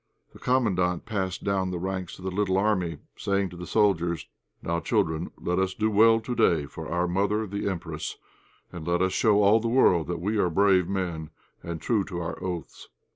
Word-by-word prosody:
The - - -14
Commandant 95 -9 +1
passed 95 -5 -3
down 95 -2 0
the 90 - -3
ranks 95 0 -4
of 95 - -11
the 95 - -2
little 95 0 +1
army, 95 -6 +1 0.2
saying 100 -1 0
to - - -10
the 90 0 -8
soldiers 85 -6 +1 0.4
"Now, 85 0 -1
children, 80 0 0
let 90 +1 -1
us 95 -1 0
do 110 0 0
well 115 +2 +6
to 120 +2 -4
day 80 -10 +3
for 80 +2 -8
our 90 +1 +1
mother, 100 +4 0
the 100 0 -3
Empress, 90 -4 -5 0.5
and 85 -2 -8
let 85 +1 +2
us 95 - +1
show 105 -2 +3
all 105 +3 +5
the 115 - -2
world 105 -9 +4
that 85 -1 -3
we 105 +5 -1
are 90 - +2
brave 95 0 +3
men, 85 -5 -3 0.3
and 85 -1 -5
true 110 +1 +1
to 90 -3 -5
our 85 0 -5
oaths." 90 -4 -6
95 Hz, 200 wpm, -26 LUFS, 85-100 Hz, 0.5 s, well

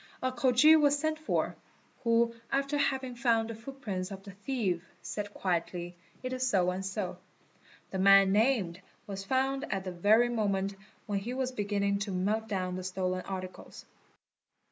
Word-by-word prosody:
A 255 - +1
Khoji 255 +5 +6
was 290 -1 +4
sent 310 +1 -1
for, 310 - -1 0.5
who 230 0 +3 0.2
after 275 +1 0
having 265 -3 0
found 230 -2 +1
the - - -5
footprints 220 -6 -5
of 195 -1 -8
the 200 - -9
thief 200 -4 -2 0.2
said 205 -1 -4
quietly: 175 -2 -2 0.3
it 255 0 -3
is 255 0 0
so 180 -5 +3
and 185 +1 -4
so. 190 -2 -3 0.7
The 190 - -3
man 195 0 +7
named 205 -5 +2 0.2
was 195 -1 -5
found 270 +5 0
at 195 -1 -1
the 185 - -4
very 215 +7 +4
moment 200 -4 0 0.3
when 205 -2 -1
he 240 +6 -5
was 260 -1 -1
beginning 200 -3 0
to 200 0 -3
melt 210 +4 0
down 185 -3 -2
the 185 - -5
stolen 185 0 -2
articles. 185 -1 -7
205 Hz, 165 wpm, -30 LUFS, 190-255 Hz, 0.7 s, man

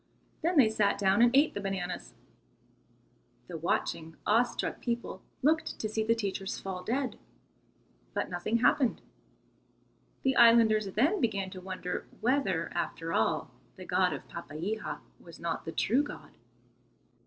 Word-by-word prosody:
Then 340 +1 +1
they 260 -6 +7
sat 210 -2 +2
down 195 +2 +3
and 240 - +7
ate 290 +3 +5
the 200 - -4
bananas. 185 -2 -4 1.3
The 175 - -7
watching, 160 0 -2
awe 220 +3 +5
struck 245 -1 -3
people 235 -5 -3 0.2
looked 315 +3 +2
to 215 - -2
see 220 +1 -1
the 230 +1 +3
teachers 200 -3 -3
fall 190 -2 -5
dead, 260 +3 -2 1.0
but - - 0
nothing 180 +6 -1
happened. 255 +1 +2 1.2
The 265 -1 +2
islanders 225 -3 +6
then 305 - +2
began 200 -5 0
to 185 - -8
wonder 185 -1 -4
whether, 230 -10 +1
after 165 -1 -3
all, 110 - +1 0.2
the - - -10
God - - +2
of - - -6
Papeiha 190 +9 -5 0.2
was 170 - -13
not 170 -1 -3
the 165 - -4
true 240 +10 +2
God. 290 - -8
215 Hz, 140 wpm, -30 LUFS, 185-240 Hz, 1.3 s, they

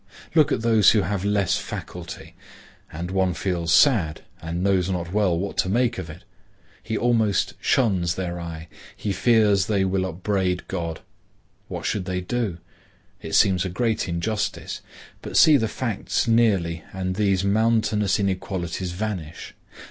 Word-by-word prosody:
Look 155 -2 +4
at 115 - 0
those 110 -4 +5
who 105 -3 +3
have 95 +1 -2
less 100 -2 +1
faculty, 85 -2 -7 0.6
and 85 +3 -5
one 95 -2 +1
feels 90 -4 -2
sad 90 - +4 0.2
and 85 +2 -3
knows 95 -2 +2
not 90 -1 -3
well 100 -5 +2
what 100 +3 -4
to 95 - +2
make 120 +1 +1
of 90 -3 -6
it. 85 +5 -11 0.6
He 110 -1 -3
almost 115 -5 +1
shuns 95 -9 +1
their 90 -2 -4
eye; 85 -1 -7 0.3
he 105 - -3
fears 105 -3 +3
they 100 -3 +1
will 95 0 0
upbraid 95 0 -1
God. 85 -2 -4 0.7
What - - -6
should 95 -3 -1
they 90 -1 -2
do? 100 -1 -2 0.6
It - - -3
seems 95 -2 +4
a 95 - -3
great 110 +1 -1
injustice. 105 +6 -3 0.4
But - - -3
see 155 - +7
the 115 -5 +2
facts 115 0 -2
nearly 100 -8 +2
and 95 -1 -3
these 100 -2 +1
mountainous 105 -1 +2
inequalities 95 -2 -2
vanish. 90 -5 -5
95 Hz, 150 wpm, -24 LUFS, 90-110 Hz, 0.7 s, see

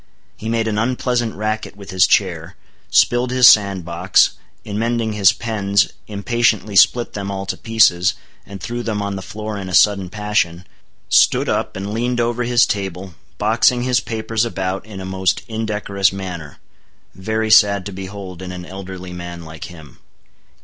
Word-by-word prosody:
He 110 - -6
made 115 -1 0
an 105 -1 -1
unpleasant 120 -1 -1
racket 110 0 -3
with 100 -2 -10
his 95 -1 +4
chair; 90 -3 0 0.3
spilled 120 +1 +3
his 125 -1 +6
sand 100 -4 +5
box; 85 +2 +3 0.3
in 105 0 -4
mending 115 -1 -1
his 100 -3 +5
pens, 100 -4 0 0.2
impatiently 110 0 0
split 120 +5 +4
them 100 -1 -4
all 100 0 -4
to 100 - -3
pieces, 100 -5 +3 0.3
and 100 -1 -10
threw 120 +8 -4
them 105 -3 -2
on 100 -1 -3
the 95 - -5
floor 105 +1 -6
in 95 -1 -6
a 90 - -1
sudden 100 -3 +4
passion; 100 -4 -1 0.4
stood - - +4
up - - -1
and 100 +2 -5
leaned 120 +2 -1
over 120 +1 0
his 120 0 +4
table, 95 -3 -4 0.2
boxing 115 +3 +2
his 125 -1 +2
papers 115 -1 -2
about 95 -4 -3
in 100 -3 -9
a 95 - -6
most 95 -1 -1
indecorous 105 -3 -1
manner, 90 -6 -7 0.6
very 110 +4 -2
sad 100 -2 +5
to 100 - -5
behold 95 -1 -8
in 90 -1 -6
an 90 -1 -7
elderly 95 -1 -8
man 85 -1 -8
like 80 -1 -9
him. 80 -6 -13
100 Hz, 170 wpm, -19 LUFS, 95-110 Hz, 0.6 s, his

